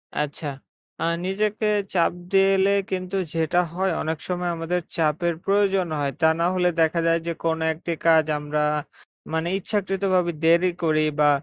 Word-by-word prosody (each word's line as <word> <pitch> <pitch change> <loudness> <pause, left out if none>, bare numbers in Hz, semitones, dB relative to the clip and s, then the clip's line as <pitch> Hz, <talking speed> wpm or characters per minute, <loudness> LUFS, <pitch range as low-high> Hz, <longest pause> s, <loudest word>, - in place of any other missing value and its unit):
আচ্ছা, 150 +1 -3 0.5
আ - - 0 0.2
নিজেকে 210 +2 -1 0.3
চাপ 170 -2 +3 0.2
দিয়ে 195 0 +5
এলে 195 +1 +3 0.2
কিন্তু 185 +1 -3 0.2
যেটা 165 +1 +1
হয়, 190 +2 0
অনেক 160 0 -2
সময় 180 -1 -2
আমাদের 170 +2 -2 0.2
চাপের 165 +2 +1
প্রয়োজন 195 -2 +2
হয়। 140 -1 0
তা 160 - +6
না 170 - +2
হলে 180 -1 +3
দেখা 160 +1 +2
যায় 165 0 +3
যে, - - 0
কোনো 160 -1 0
একটি 170 +2 -6
কাজ 160 -2 +5
আমরা 150 +1 -2 0.7
মানে 160 +1 0
ইচ্ছাকৃতভাবে 190 -3 0
দেরি 170 +2 +4
করি, 155 -1 +2 0.2
বা 145 0 +5
175 Hz, 160 wpm, -24 LUFS, 160-190 Hz, 0.7 s, তা